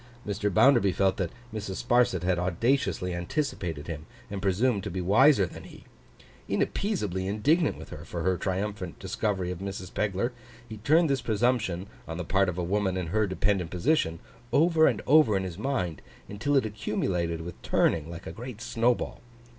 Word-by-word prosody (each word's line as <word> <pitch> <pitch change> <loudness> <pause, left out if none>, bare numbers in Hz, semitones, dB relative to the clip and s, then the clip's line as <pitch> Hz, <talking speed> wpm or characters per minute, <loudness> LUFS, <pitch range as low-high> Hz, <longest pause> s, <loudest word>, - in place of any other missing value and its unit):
Mr. 105 0 -1
Bounderby 120 -1 +5
felt 95 +1 +1
that 90 -3 -1 0.2
Mrs. 105 -1 -5
Sparsit 120 -8 +3
had 90 -1 +1
audaciously 90 +1 0
anticipated 85 - -3
him, 80 -1 -6 0.2
and 100 -1 -4
presumed 100 +2 +1
to 100 - -3
be 95 - -4
wiser 105 +5 +5
than 85 - -10
he. - - -13 0.7
Inappeasably 105 - -1
indignant 145 - +2
with - - -10
her - - -8
for 85 -2 -5
her 95 +1 +2
triumphant 95 0 -3
discovery 95 -1 -2
of 90 - -6
Mrs. 95 -1 -6
Pegler, 105 +4 0 0.4
he 110 -1 -8
turned 155 +10 +4
this 135 -3 0
presumption, 110 -5 0 0.2
on 80 - -5
the 90 - -4
part 95 +2 +2
of 90 - -4
a 90 - -1
woman 95 +1 0
in 90 -3 -3
her 110 -1 +2
dependent 95 -2 0
position, 90 - +1 0.3
over 160 0 +5
and - - 0
over 145 -8 +5
in 95 - -1
his 90 -1 -6
mind, 105 - -2 0.3
until 110 +8 -1
it 130 - +2
accumulated 90 -6 -2
with 85 0 -8
turning 80 -1 +1
like 85 -1 -8
a - - -5
great 120 +4 -8
snowball. 120 0 0
100 Hz, 175 wpm, -28 LUFS, 90-120 Hz, 0.7 s, Bounderby